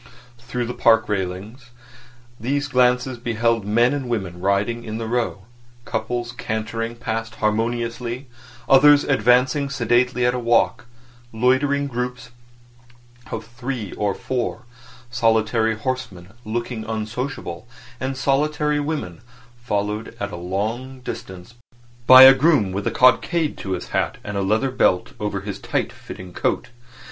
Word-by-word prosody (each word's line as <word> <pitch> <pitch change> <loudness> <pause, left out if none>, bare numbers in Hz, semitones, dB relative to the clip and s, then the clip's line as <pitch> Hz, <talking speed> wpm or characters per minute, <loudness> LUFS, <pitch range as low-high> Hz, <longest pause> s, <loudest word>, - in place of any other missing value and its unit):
Through 120 0 -4
the 120 - -4
park 110 -1 +4
railings 105 +5 -4 0.7
these 140 +5 -1
glances 125 -1 +2
beheld 115 -2 0
men 120 +5 +3
and 135 -4 -3
women 95 -7 -3
riding 100 +5 0
in 110 -1 -5
the 115 - -4
Row, 115 -4 -2 0.4
couples 120 -1 -3
cantering 115 +1 -4
past 115 -1 -4
harmoniously, 115 +3 -2 0.4
others 145 +2 +7
advancing 130 +3 +2
sedately 125 -1 +1
at 125 - +3
a 125 - -2
walk, 120 +1 +1 0.4
loitering 130 +5 +2
groups 125 -1 -4 1.0
of 115 0 -5
three 120 -2 -5
or 100 -2 -1
four, 125 -1 -3 0.5
solitary 110 -1 +2
horsemen 110 -7 -5 0.2
looking 115 +1 -3
unsociable, 110 -3 -5 0.3
and 130 0 -3
solitary 150 +2 +1
women 145 - -4 0.4
followed 105 0 -3
at - - -3
a - - -6
long 110 +9 -4
distance 110 -5 -8 0.5
by 130 0 +11
a 135 0 +11
groom 135 - +3
with 100 +2 -3
a - - +3
cockade 150 +5 +3
to 95 - -3
his 90 - -5
hat - - -1
and 105 - -6
a 100 - 0
leather 110 +7 +1
belt 90 -7 +1
over 105 -2 -2
his 100 -1 -6
tight - - -2
fitting 90 -1 -10
coat. 130 - -1
120 Hz, 135 wpm, -22 LUFS, 110-130 Hz, 1.0 s, by